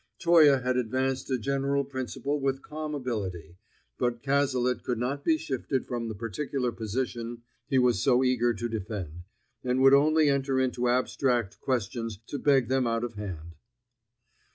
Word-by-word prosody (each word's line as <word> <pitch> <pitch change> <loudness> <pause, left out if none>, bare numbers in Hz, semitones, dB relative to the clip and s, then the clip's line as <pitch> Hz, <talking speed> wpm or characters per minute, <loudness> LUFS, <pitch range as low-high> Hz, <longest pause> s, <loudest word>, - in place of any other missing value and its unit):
Toye 160 -5 +6
had 125 0 +1
advanced 130 +2 -1
a 130 - +1
general 140 +3 0
principle 135 +2 -3
with 135 0 -1
calm 155 0 -5
ability, 95 - -4 0.4
but 120 -1 -1
Cazalet 130 -3 +1
could 125 - -2
not 135 +4 -2
be 160 -1 +3
shifted 135 -3 -2
from 120 -2 -3
the 110 - -5
particular 125 +4 -2
position 120 +1 -4 0.2
he 135 - +1
was 125 -6 +3
so 130 -1 +4
eager 125 -2 +2
to 120 0 -3
defend, 95 -7 -5 0.4
and 125 0 0
would 135 0 +7
only 155 +2 +5
enter 135 -1 +1
into 125 -1 0
abstract 125 -3 0
questions 115 -3 -2
to 140 - -5
beg 135 -4 +3
them 130 -1 +1
out 115 0 0
of 120 -1 -4
hand. 90 -6 -7
125 Hz, 155 wpm, -28 LUFS, 115-135 Hz, 0.4 s, would